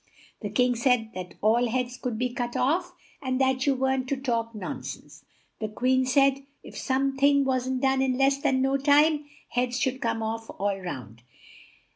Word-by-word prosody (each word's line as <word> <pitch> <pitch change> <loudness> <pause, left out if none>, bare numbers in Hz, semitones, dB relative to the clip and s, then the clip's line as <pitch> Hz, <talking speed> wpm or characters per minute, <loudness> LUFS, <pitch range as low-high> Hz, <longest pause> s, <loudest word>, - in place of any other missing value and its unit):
The 205 - -3
King 250 +4 +2
said 235 -2 +1
that 180 -1 -7
all 230 +3 +3
heads 250 +1 -1
could 250 -3 -4
be 250 +1 -1
cut 240 -1 -3
off, 345 +7 +1 0.3
and 260 -1 -1
that 265 0 +1
you 275 - +4
weren't 265 0 0
to 275 - 0
talk 230 -3 -2
non 200 -4 -5
sense. - - -9 0.4
The 215 - -2
Queen 255 +4 +1
said, 275 +1 +3 0.2
if - - -12
some 270 0 0
thing 280 0 +4
wasn't 260 0 -1
done 265 0 +3
in 260 -1 +1
less 275 +1 +2
than 260 -1 +2
no 270 +1 +2
time, 295 +2 +4 0.2
heads 245 0 -1
should 260 0 -1
come 225 -1 -1
off 225 +1 -4
all 200 0 0
round. 125 - -7
255 Hz, 185 wpm, -26 LUFS, 230-270 Hz, 0.4 s, you